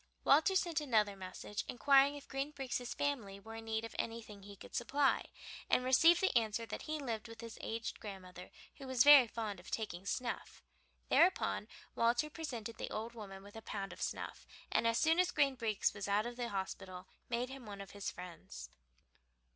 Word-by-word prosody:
Walter 320 Hz, +7 st, +5 dB
sent 340 Hz, -4 st, +1 dB
another 215 Hz, -8 st, +2 dB
message, 190 Hz, +2 st, -5 dB
inquiring 275 Hz, +2 st, +5 dB
if 285 Hz, -, -10 dB
Green 275 Hz, +2 st, -2 dB
Breeks' 260 Hz, -4 st, -4 dB
family 230 Hz, -9 st, -2 dB
were 220 Hz, +3 st, -10 dB
in 225 Hz, -, -8 dB
need 220 Hz, 0 st, -1 dB
of 230 Hz, -, -9 dB
anything 225 Hz, -3 st, -4 dB
he 200 Hz, +1 st, -11 dB
could -, -, -13 dB
supply, 275 Hz, +3 st, +2 dB, 0.4 s
and 250 Hz, -, +4 dB
received 325 Hz, +7 st, +6 dB
the 380 Hz, -8 st, +2 dB
answer 230 Hz, -1 st, +2 dB
that -, -, -6 dB
he 310 Hz, 0 st, -3 dB
lived 235 Hz, -6 st, -4 dB
with 230 Hz, 0 st, -10 dB
his 230 Hz, -1 st, -8 dB
aged 225 Hz, 0 st, -4 dB
grandmother 185 Hz, -3 st, -9 dB, 0.3 s
who 275 Hz, -, -9 dB
was 255 Hz, -2 st, +4 dB
very 285 Hz, -4 st, +10 dB
fond 215 Hz, -4 st, -4 dB
of 180 Hz, -, -12 dB
taking 200 Hz, -4 st, -4 dB
snuff. 240 Hz, -, -3 dB, 0.5 s
Thereupon 100 Hz, +2 st, +3 dB, 0.3 s
Walter 240 Hz, +6 st, +2 dB
presented 235 Hz, -9 st, -5 dB
the -, -, -3 dB
old 225 Hz, +2 st, -4 dB
woman 195 Hz, -4 st, -9 dB
with 205 Hz, +1 st, -13 dB
a 225 Hz, -, -7 dB
pound 200 Hz, -2 st, -5 dB
of -, -, -12 dB
snuff, -, -, -4 dB, 0.2 s
and 230 Hz, -, +3 dB
as 230 Hz, 0 st, +2 dB
soon 325 Hz, +4 st, +4 dB
as 365 Hz, 0 st, +4 dB
Green 280 Hz, -5 st, +3 dB
Breeks 225 Hz, -5 st, 0 dB
was 205 Hz, -1 st, -5 dB
out 205 Hz, +2 st, +2 dB
of 240 Hz, 0 st, -5 dB
the 240 Hz, -1 st, -3 dB
hospital 190 Hz, -1 st, -5 dB, 0.2 s
made 245 Hz, +1 st, -1 dB
him 265 Hz, -4 st, -9 dB
one 200 Hz, -1 st, -7 dB
of 195 Hz, -1 st, -8 dB
his 200 Hz, -1 st, -4 dB
friends. 170 Hz, -, -9 dB
230 Hz, 195 wpm, -36 LUFS, 200-270 Hz, 0.5 s, very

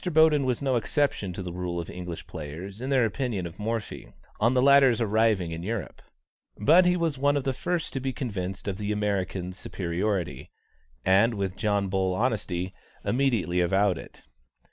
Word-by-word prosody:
Boden 160 Hz, -4 st, +4 dB
was 130 Hz, +1 st, -1 dB
no 130 Hz, -3 st, +2 dB
exception 120 Hz, -5 st, 0 dB
to 95 Hz, +1 st, -6 dB
the 90 Hz, -1 st, -5 dB
rule 90 Hz, -1 st, -3 dB
of 85 Hz, -, -5 dB
English 90 Hz, -2 st, -7 dB
players 85 Hz, +8 st, -7 dB
in 130 Hz, -, -3 dB
their 130 Hz, -4 st, +4 dB
opinion 115 Hz, -4 st, -2 dB
of 85 Hz, +3 st, -9 dB
Morphy, 110 Hz, +1 st, -4 dB, 0.3 s
on 115 Hz, +4 st, +3 dB
the 125 Hz, -, +4 dB
latter's 135 Hz, -3 st, +6 dB
arriving 110 Hz, -5 st, +2 dB
in 80 Hz, 0 st, -5 dB
Europe; 105 Hz, +3 st, -4 dB, 0.6 s
but 165 Hz, -, +6 dB
he 180 Hz, 0 st, +3 dB
was 165 Hz, -5 st, -1 dB
one 145 Hz, +1 st, +3 dB
of 140 Hz, -, -1 dB
the 135 Hz, -1 st, 0 dB
first 175 Hz, +5 st, -2 dB
to 135 Hz, -, -1 dB
be 130 Hz, 0 st, -2 dB
convinced 100 Hz, -8 st, -4 dB
of 100 Hz, 0 st, -3 dB
the 105 Hz, 0 st, -2 dB
American's 95 Hz, -3 st, -2 dB
superiority, 90 Hz, +1 st, -2 dB, 0.6 s
and, 100 Hz, +5 st, +4 dB
with 95 Hz, -2 st, -2 dB
John 100 Hz, -2 st, 0 dB
Bull 95 Hz, -1 st, 0 dB
honesty, 95 Hz, -6 st, -1 dB, 0.3 s
immediately 120 Hz, -9 st, +1 dB
avowed 95 Hz, +1 st, +2 dB
it. -, -, -13 dB
105 Hz, 175 wpm, -27 LUFS, 90-130 Hz, 0.6 s, latter's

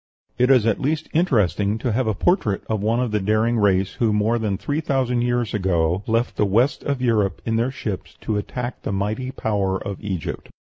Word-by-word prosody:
It 125 Hz, +1 st, +4 dB
is 125 Hz, -5 st, +5 dB
at 115 Hz, -3 st, +1 dB
least 155 Hz, +3 st, -1 dB
interesting 105 Hz, -, +2 dB
to 120 Hz, +1 st, -2 dB
have 120 Hz, +2 st, 0 dB
a 110 Hz, -, +1 dB
portrait 110 Hz, -, +1 dB
of 110 Hz, -2 st, -2 dB
one 110 Hz, +3 st, +1 dB
of 125 Hz, -3 st, -1 dB
the 105 Hz, -, +1 dB
daring 110 Hz, +4 st, +1 dB
race 95 Hz, -2 st, +2 dB
who 115 Hz, -3 st, +1 dB
more 105 Hz, +3 st, +1 dB
than 105 Hz, -3 st, -1 dB
three 145 Hz, +8 st, -2 dB
thousand 130 Hz, -5 st, 0 dB
years 120 Hz, -2 st, 0 dB
ago 90 Hz, -2 st, +1 dB
left 115 Hz, +1 st, 0 dB
the -, -, +3 dB
west 120 Hz, +8 st, +2 dB
of 140 Hz, -3 st, -2 dB
Europe 105 Hz, -5 st, +1 dB
in 115 Hz, -, 0 dB
their 115 Hz, +3 st, +1 dB
ships 105 Hz, -7 st, -6 dB
to 105 Hz, -, -1 dB
attack 120 Hz, +4 st, -4 dB
the -, -, -3 dB
mighty 105 Hz, +6 st, -2 dB
power 100 Hz, -6 st, -1 dB
of 100 Hz, 0 st, -6 dB
Egypt. 95 Hz, -5 st, -4 dB
110 Hz, 205 wpm, -22 LUFS, 100-125 Hz, -, is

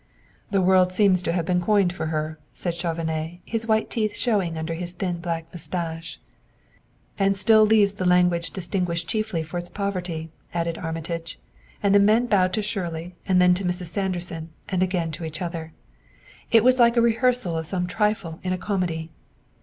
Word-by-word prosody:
"The 195 Hz, -3 st, +2 dB
word 185 Hz, 0 st, +4 dB
seems 185 Hz, -1 st, +3 dB
to 170 Hz, -, -1 dB
have 170 Hz, -1 st, -1 dB
been 180 Hz, +1 st, +1 dB
coined 195 Hz, -2 st, +3 dB
for 160 Hz, -3 st, -3 dB
her," 155 Hz, 0 st, -3 dB
said 175 Hz, -, -2 dB
Chauvenet, 165 Hz, -1 st, -3 dB
his 225 Hz, 0 st, -3 dB
white 220 Hz, 0 st, +1 dB
teeth 215 Hz, -2 st, -1 dB
showing 195 Hz, -9 st, +1 dB
under 160 Hz, +1 st, -3 dB
his 175 Hz, +1 st, -5 dB
thin 180 Hz, -1 st, -3 dB
black 165 Hz, -1 st, -3 dB
mustache. 165 Hz, -1 st, -5 dB, 1.0 s
"And 195 Hz, 0 st, +2 dB
still 215 Hz, +2 st, +6 dB
leaves 210 Hz, -2 st, +4 dB
the 190 Hz, -2 st, -3 dB
language 180 Hz, -1 st, +3 dB
distinguished 175 Hz, -2 st, -2 dB
chiefly 215 Hz, -6 st, -1 dB
for 165 Hz, +3 st, -5 dB
its 175 Hz, -, -6 dB
poverty," 180 Hz, -5 st, -3 dB, 0.2 s
added 170 Hz, -1 st, -1 dB
Armitage; 165 Hz, 0 st, -4 dB, 0.5 s
and 200 Hz, -1 st, +4 dB
the 205 Hz, -, +7 dB
men 215 Hz, +4 st, +4 dB
bowed 190 Hz, -5 st, +3 dB
to 215 Hz, -, 0 dB
Shirley 175 Hz, -5 st, -4 dB
and 185 Hz, -2 st, +4 dB
then 180 Hz, 0 st, +6 dB
to 185 Hz, +2 st, -2 dB
Mrs. 180 Hz, -1 st, -2 dB
Sanderson, 175 Hz, -4 st, -3 dB, 0.2 s
and 185 Hz, -2 st, -1 dB
again 180 Hz, -3 st, 0 dB
to 160 Hz, -, -7 dB
each 160 Hz, 0 st, -5 dB
other. 165 Hz, -2 st, -5 dB, 0.8 s
It 225 Hz, -2 st, +5 dB
was 255 Hz, +1 st, +5 dB
like 235 Hz, 0 st, +5 dB
a -, -, +6 dB
rehearsal 235 Hz, -5 st, +2 dB
of 160 Hz, -1 st, -2 dB
some 180 Hz, 0 st, -1 dB
trifle 195 Hz, -3 st, -1 dB
in 185 Hz, -, -2 dB
a -, -, -1 dB
comedy. 175 Hz, -5 st, -2 dB
180 Hz, 180 wpm, -24 LUFS, 165-200 Hz, 1.0 s, the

